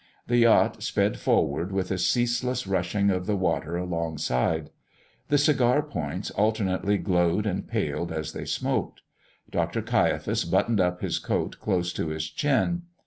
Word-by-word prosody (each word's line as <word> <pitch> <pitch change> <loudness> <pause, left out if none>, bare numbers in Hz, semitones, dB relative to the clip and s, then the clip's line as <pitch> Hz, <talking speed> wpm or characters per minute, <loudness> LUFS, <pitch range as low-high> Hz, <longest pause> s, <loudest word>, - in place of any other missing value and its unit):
The 120 - +1
yacht 115 -1 +4
sped - - 0
forward, 85 +7 +1
with 95 -1 -2
a 95 - -1
ceaseless 120 +5 +1
rushing 95 +1 +1
of 90 -1 -2
the 105 - +1
water 85 -2 -1
alongside. 80 -4 -1 0.6
The 145 - +3
cigar 145 -1 +3
points 90 - -4
alternately 100 -2 +1
glowed 90 +1 +1
and 100 -2 -2
paled 85 0 -2
as 80 -1 -4
they - - -6
smoked. - - -2 0.5
Dr. - - -1
Caiaphas - - +1
buttoned 115 -4 +2
up 90 0 0
his - - -1
coat - - -2
close 90 -4 -1
to - - -2
his 80 0 -3
chin. 150 +5 +1
95 Hz, 145 wpm, -26 LUFS, 85-115 Hz, 0.6 s, yacht